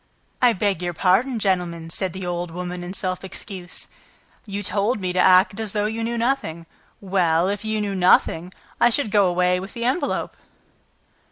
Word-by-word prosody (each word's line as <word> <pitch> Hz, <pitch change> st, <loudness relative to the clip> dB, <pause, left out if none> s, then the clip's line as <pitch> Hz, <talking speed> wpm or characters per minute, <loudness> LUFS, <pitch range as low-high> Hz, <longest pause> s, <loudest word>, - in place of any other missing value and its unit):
"I 245 Hz, -2 st, +5 dB
beg 195 Hz, -3 st, -1 dB
your 175 Hz, -1 st, -3 dB
pardon, 225 Hz, +10 st, +2 dB
gentlemen," 175 Hz, -5 st, -1 dB
said 190 Hz, +1 st, -2 dB
the 190 Hz, +1 st, -6 dB
old 175 Hz, 0 st, -3 dB
woman, 180 Hz, +1 st, -5 dB
in 175 Hz, -, -6 dB
self 185 Hz, -1 st, -3 dB
excuse, 185 Hz, -1 st, -8 dB, 0.6 s
"you 200 Hz, 0 st, -4 dB
told 205 Hz, +4 st, +1 dB
me 185 Hz, -2 st, -2 dB
to 180 Hz, -, 0 dB
act 185 Hz, +3 st, +5 dB
as 220 Hz, -3 st, -3 dB
though 210 Hz, -1 st, 0 dB
you 225 Hz, +2 st, -2 dB
knew 235 Hz, +1 st, -2 dB
nothing... 230 Hz, -10 st, -1 dB, 0.3 s
Well, 180 Hz, -3 st, +1 dB
if 205 Hz, +1 st, -3 dB
you 220 Hz, 0 st, -1 dB
knew 205 Hz, -1 st, -2 dB
nothing, 180 Hz, -1 st, +3 dB, 0.3 s
I 240 Hz, -, +5 dB
should 235 Hz, -2 st, 0 dB
go 205 Hz, -3 st, +4 dB
away 180 Hz, 0 st, +2 dB
with 195 Hz, +6 st, -9 dB
your 235 Hz, +1 st, -1 dB
envelope!" 285 Hz, +3 st, -1 dB
190 Hz, 180 wpm, -22 LUFS, 180-215 Hz, 0.6 s, I